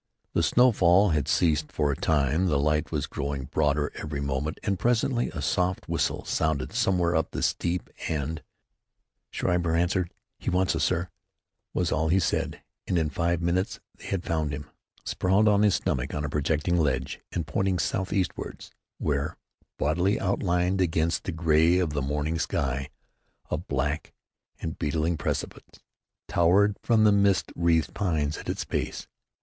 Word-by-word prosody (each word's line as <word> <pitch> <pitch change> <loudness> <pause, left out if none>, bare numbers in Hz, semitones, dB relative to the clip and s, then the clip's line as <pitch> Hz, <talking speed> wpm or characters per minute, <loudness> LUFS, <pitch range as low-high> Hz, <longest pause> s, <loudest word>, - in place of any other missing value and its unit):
The - - +2
snowfall 100 0 +5
had 75 -3 0
ceased 80 -1 +2
for 75 -2 +1
a - - -1
time. 75 +5 +1
The 75 -5 +2
light 75 +1 +1
was - - -1
growing 70 -1 -4
broader 75 +2 0
every 75 -2 -5
moment, 70 +2 -2
and 100 -3 -1
presently 120 +1 +1
a 75 -4 -5
soft 90 +4 0
whistle - - -1
sounded 80 -5 -1
somewhere 90 -2 +2
up 80 - +1
the - - -4
steep, 85 +1 0 0.2
and 80 +1 -2 0.9
Schreiber 85 -2 0
answered. 90 +1 +1 0.3
"He - - -2
wants 90 +1 +2
us, - - 0
sir," 85 +2 0 0.7
was 90 -3 +1
all 80 0 +1
he 90 - +4
said, 85 - -1 0.2
and 90 - +1
in 80 -2 0
five 85 +3 0
minutes 90 +3 0 0.2
they - - -14
had 95 -2 -2
found 80 -3 -1
him, 70 0 -6 0.4
sprawled 95 +4 +2
on 105 -1 +4
his 105 -2 +4
stomach 65 +1 -1
on 75 0 -2
a - - -3
projecting 75 +4 0
ledge, 65 -4 0
and 85 - -2
pointing 95 +5 0
southeastward, 95 0 -2 0.3
where, 70 -1 -1 0.4
boldly 90 +7 +1
outlined 90 -1 +1
against 80 -2 0
the - - -2
gray 80 +1 +3
of 90 -4 +1
the 70 -1 -1
morning 75 +4 -1
sky, 70 -2 -1 0.6
a - - +1
black 75 -2 -2 0.5
and 80 - -5
beetling 80 +3 0
precipice 80 - -3 0.6
towered 100 +4 +4
from 110 -2 +3
the 105 - +6
mist 100 -1 +3
wreathed 85 -1 +2
pines 80 -7 -1
at - - -8
its - - -2
base. - - -3
80 Hz, 160 wpm, -27 LUFS, 75-90 Hz, 0.9 s, the